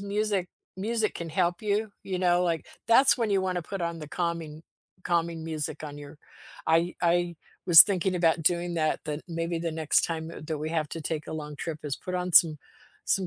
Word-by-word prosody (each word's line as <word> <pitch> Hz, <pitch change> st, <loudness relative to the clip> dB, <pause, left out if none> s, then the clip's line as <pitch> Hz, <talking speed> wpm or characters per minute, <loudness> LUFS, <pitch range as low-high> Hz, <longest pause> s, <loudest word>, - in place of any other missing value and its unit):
music 200 Hz, -2 st, -1 dB, 0.3 s
music 220 Hz, +2 st, -1 dB
can 170 Hz, -1 st, -6 dB
help 175 Hz, +1 st, 0 dB
you, 210 Hz, 0 st, -1 dB
you 185 Hz, -2 st, -3 dB
know? 175 Hz, 0 st, +3 dB
Like, 165 Hz, -3 st, -1 dB, 0.2 s
that's 255 Hz, +3 st, +5 dB
when 225 Hz, -3 st, 0 dB
you 195 Hz, -1 st, +2 dB
wanna 180 Hz, -2 st, -2 dB
put 195 Hz, +3 st, -6 dB
on 170 Hz, -1 st, -3 dB
the 150 Hz, -, -8 dB
calming 165 Hz, -2 st, -4 dB, 0.4 s
calming 170 Hz, -1 st, -1 dB
music 155 Hz, -1 st, -4 dB
on 145 Hz, -1 st, -7 dB
your 145 Hz, +1 st, -11 dB, 0.5 s
I 165 Hz, +2 st, +2 dB
I 175 Hz, 0 st, +2 dB, 0.3 s
was 170 Hz, -2 st, +11 dB
thinking 190 Hz, -2 st, -1 dB
about 165 Hz, -2 st, +1 dB
doing 175 Hz, 0 st, +1 dB
that, 155 Hz, -1 st, 0 dB
then 150 Hz, 0 st, -4 dB
maybe 165 Hz, 0 st, -3 dB
the 165 Hz, -1 st, -3 dB
next 160 Hz, -2 st, +2 dB
time, 165 Hz, -1 st, -4 dB
uh, -, -, -9 dB
that 155 Hz, -1 st, -3 dB
we 155 Hz, +1 st, -3 dB
have 155 Hz, -3 st, -1 dB
to 165 Hz, -, -5 dB
take 155 Hz, 0 st, -4 dB
a -, -, -6 dB
long 150 Hz, -2 st, -6 dB
trip 155 Hz, +1 st, -5 dB
is 145 Hz, -3 st, -3 dB
put 185 Hz, -, -6 dB
on 180 Hz, 0 st, -2 dB
some 160 Hz, -2 st, +6 dB, 0.5 s
some 190 Hz, -2 st, +1 dB
170 Hz, 210 wpm, -27 LUFS, 160-185 Hz, 0.5 s, was